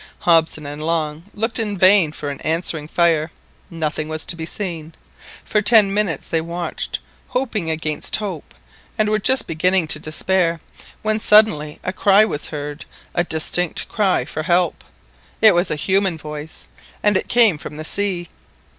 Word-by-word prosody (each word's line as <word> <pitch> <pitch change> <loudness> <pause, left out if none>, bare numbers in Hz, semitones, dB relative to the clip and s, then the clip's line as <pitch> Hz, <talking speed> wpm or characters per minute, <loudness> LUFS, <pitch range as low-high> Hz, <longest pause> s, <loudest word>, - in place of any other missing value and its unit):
Hobson 160 -3 +2
and 145 +1 -6
Long 160 0 -2
looked 225 +3 -1
in 210 -3 -2
vain 185 -3 +5
for 150 -1 -5
an 140 - -7
answering 160 -2 -1
fire—nothing 160 -1 -2
was 155 0 -4
to 175 - -1
be 160 -1 -6
seen. 165 -6 -5 0.5
For 210 - +1
ten 210 -2 +5
minutes 195 -8 -1
they 165 - -1
watched, 170 +1 -4 0.3
hoping 225 -10 -2
against 155 -1 -1
hope, 195 -8 -4 0.4
and 215 -1 +1
were 215 0 +1
just 260 +5 +2
beginning 180 +2 +2
to 150 - 0
despair, 165 +2 0 0.4
when 215 0 0
suddenly 210 -10 +4
a 185 - -3
cry 200 +2 +5
was 150 -8 -3
heard, 145 -1 -6 0.3
a 175 - +1
distinct 165 +1 -1
cry 190 - +1
for 155 +2 -5
help. 175 0 +1 0.6
It 220 -2 +7
was 175 +1 +2
a - - -1
human 190 +2 0
voice, 150 0 -8 0.4
and 210 -1 +4
it - - 0
came 225 -10 +4
from 150 0 -8
the 155 - -6
sea. 185 -2 -1
170 Hz, 160 wpm, -20 LUFS, 155-200 Hz, 0.6 s, It